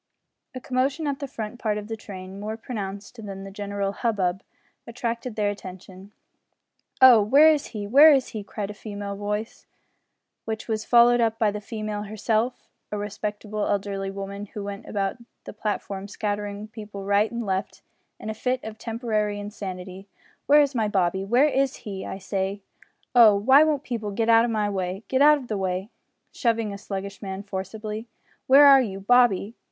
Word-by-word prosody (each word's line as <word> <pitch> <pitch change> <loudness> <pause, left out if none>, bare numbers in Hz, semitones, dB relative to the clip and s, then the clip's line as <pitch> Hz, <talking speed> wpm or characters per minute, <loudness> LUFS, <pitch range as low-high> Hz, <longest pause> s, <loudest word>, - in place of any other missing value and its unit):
A - - -4
commotion 265 +5 -1
at 280 -2 -2
the 280 - -4
front 225 -1 -6
part 210 -2 -1
of 210 0 -6
the 225 - -4
train, 195 -2 -9
more 215 +2 -4
pronounced 210 -1 -7
than 195 -1 -7
the 195 - -8
general 200 0 -3
hubbub, 195 -4 -1 0.5
attracted 235 0 -4
their 205 -1 +1
attention. 190 0 -11 0.9
"Oh! 245 -4 +9
where 280 +9 +6
is 300 -2 0
he 210 -3 -6
where 285 +9 +8
is 270 -3 +2
he?" 215 -2 -6
cried 200 0 -5
a - - -8
female 205 -1 -6
voice, 210 +2 -4 0.8
which 220 0 -5
was 215 -2 -2
followed 240 0 +5
up 225 -1 +1
by 220 -2 +2
the 210 0 -6
female 215 -1 -4
herself, 220 +3 -1 0.2
a 210 - -2
respectable 210 0 -4
elderly 195 -1 -2
woman, 200 +1 -6
who 205 +1 -7
went 200 0 -7
about 195 0 -2 0.3
the - - -9
platform 200 -2 -4
scattering 205 0 -4
people 210 -3 -8
right 205 +2 +2
and 235 -1 -4
left 190 -1 -3 0.4
in - - -8
a 220 - -2
fit 250 +3 -2
of 220 0 -8
temporary 220 -3 -2
insanity, 195 -2 -7 0.4
"where 295 +1 +7
is 285 -1 +1
my 225 -4 +1
Bobby, 190 -2 0
where 240 +8 +4
is 275 -2 +1
he, 195 -3 -5
I - - -5
say? 195 +1 -3 0.5
Oh! 230 -4 +8
why 265 +9 +6
won't 300 -3 0
people 230 -6 -4
git 225 +3 -1
out 230 0 +6
o' - - -1
my 215 -3 0
way? 190 0 -3
Git 265 +1 +1
out 300 +1 +7
o' 270 - -8
the 215 -4 -3
way," 190 +3 -2 0.4
(shoving 230 -4 0
a - - -6
sluggish 195 0 -6
man 195 -1 -5
forcibly), 210 +3 -6 0.4
"where 275 +2 +8
are 275 -1 +8
you, 195 -6 -4
Bobby? 225 -1 +3
210 Hz, 180 wpm, -25 LUFS, 200-235 Hz, 0.9 s, Oh